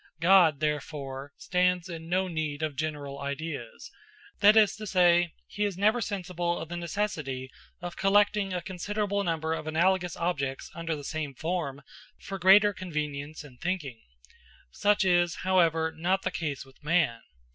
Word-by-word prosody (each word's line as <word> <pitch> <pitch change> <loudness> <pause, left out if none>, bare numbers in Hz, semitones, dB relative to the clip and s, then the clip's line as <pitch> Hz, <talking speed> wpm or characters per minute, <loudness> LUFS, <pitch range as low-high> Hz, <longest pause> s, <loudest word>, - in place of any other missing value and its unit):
God, 170 -4 +5
therefore, 145 -2 -3
stands 180 -1 +1
in 165 -2 -8
no 185 +1 +1
need 155 -3 -3
of 155 -2 -2
general 145 -1 -4
ideas; 140 -3 -6 0.5
that 210 +2 +7
is 210 -3 +5
to 215 0 -7
say, 175 -2 +4
he 210 - -3
is 200 -3 -1
never 215 +5 +3
sensible 175 -4 -2
of 165 - -6
the 175 - -4
necessity 155 -8 -3 0.3
of 175 0 -6
collecting 205 0 +3
a 180 -1 -3
considerable 200 +2 -2
number 160 -2 -1
of 155 - -5
analogous 180 +2 +1
objects 140 -6 -2
under 165 -1 -3
the 145 - -8
same 150 -2 -4
form 155 -3 -3 0.4
for 195 0 -6
greater 200 +3 +6
convenience 150 -4 -4
in 130 -4 -15
thinking. 155 -9 -3 0.7
Such 205 - +2
is, 175 -2 +3
however, 165 -4 +3
not 185 +4 0
the - - -1
case 145 -5 -4
with 135 +2 -21
man. 150 -7 +2
170 Hz, 155 wpm, -28 LUFS, 150-185 Hz, 0.7 s, that